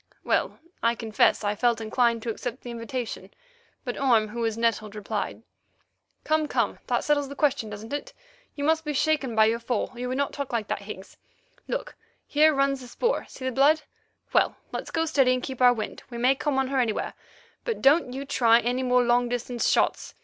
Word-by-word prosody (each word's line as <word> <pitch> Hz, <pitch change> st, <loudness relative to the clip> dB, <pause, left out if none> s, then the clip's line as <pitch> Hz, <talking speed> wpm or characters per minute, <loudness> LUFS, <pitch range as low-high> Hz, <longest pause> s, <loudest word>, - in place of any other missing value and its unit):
Well, -, -, 0 dB, 0.2 s
I 230 Hz, 0 st, +2 dB
confess 220 Hz, -1 st, +2 dB
I 205 Hz, 0 st, +1 dB
felt 235 Hz, +2 st, +1 dB
inclined 230 Hz, +1 st, +1 dB
to 230 Hz, -, -1 dB
accept 245 Hz, +3 st, -5 dB
the 245 Hz, -, -6 dB
invitation, 235 Hz, +1 st, -5 dB, 0.6 s
but -, -, -4 dB
Orme, 230 Hz, -6 st, +3 dB
who 235 Hz, +3 st, -6 dB
was 225 Hz, -1 st, -1 dB
nettled, 220 Hz, -2 st, 0 dB
replied: 210 Hz, -1 st, -4 dB, 0.8 s
"Come, 310 Hz, 0 st, +1 dB
come; -, -, 0 dB
that -, -, +1 dB
settles 290 Hz, -2 st, +1 dB
the 280 Hz, -, -7 dB
question, 280 Hz, -7 st, +1 dB
doesn't 210 Hz, +4 st, -8 dB
it? 290 Hz, -, -4 dB, 0.4 s
You 285 Hz, -, -4 dB
must 320 Hz, +2 st, +2 dB
be 300 Hz, -1 st, -3 dB
shaken 285 Hz, -4 st, +1 dB
by 220 Hz, 0 st, +6 dB
your 225 Hz, +1 st, +1 dB
fall, 235 Hz, 0 st, -2 dB
or 240 Hz, -, -12 dB
you 250 Hz, -, -3 dB
would 255 Hz, +1 st, -2 dB
not 280 Hz, 0 st, -1 dB
talk 280 Hz, -2 st, -4 dB
like 230 Hz, -3 st, -1 dB
that, -, -, -2 dB
Higgs. 200 Hz, -1 st, -10 dB, 0.5 s
Look, -, -, -3 dB, 0.3 s
here 305 Hz, +2 st, +4 dB
runs 275 Hz, -1 st, +1 dB
the 250 Hz, -, -10 dB
spoor—see 370 Hz, -, -2 dB
the 260 Hz, -, 0 dB
blood? 295 Hz, +4 st, +4 dB, 0.5 s
Well, -, -, +3 dB, 0.2 s
let's -, -, -5 dB
go 325 Hz, -1 st, 0 dB
steady 270 Hz, -5 st, +3 dB
and 255 Hz, -, -4 dB
keep 260 Hz, -2 st, -5 dB
our 250 Hz, -1 st, +8 dB
wind. 220 Hz, -3 st, -4 dB
We 240 Hz, -, -7 dB
may 250 Hz, +3 st, +4 dB
come 275 Hz, 0 st, -1 dB
on 265 Hz, -1 st, +1 dB
her 270 Hz, -1 st, +1 dB
anywhere, 230 Hz, -4 st, -1 dB, 0.5 s
but 465 Hz, -3 st, -2 dB
don't 275 Hz, -1 st, +4 dB
you 270 Hz, +2 st, -5 dB
try 235 Hz, -4 st, +4 dB
any 245 Hz, +2 st, -1 dB
more 250 Hz, -1 st, +3 dB
long 240 Hz, 0 st, +2 dB
distance 245 Hz, 0 st, -1 dB
shots. -, -, +1 dB
250 Hz, 205 wpm, -26 LUFS, 230-275 Hz, 0.8 s, our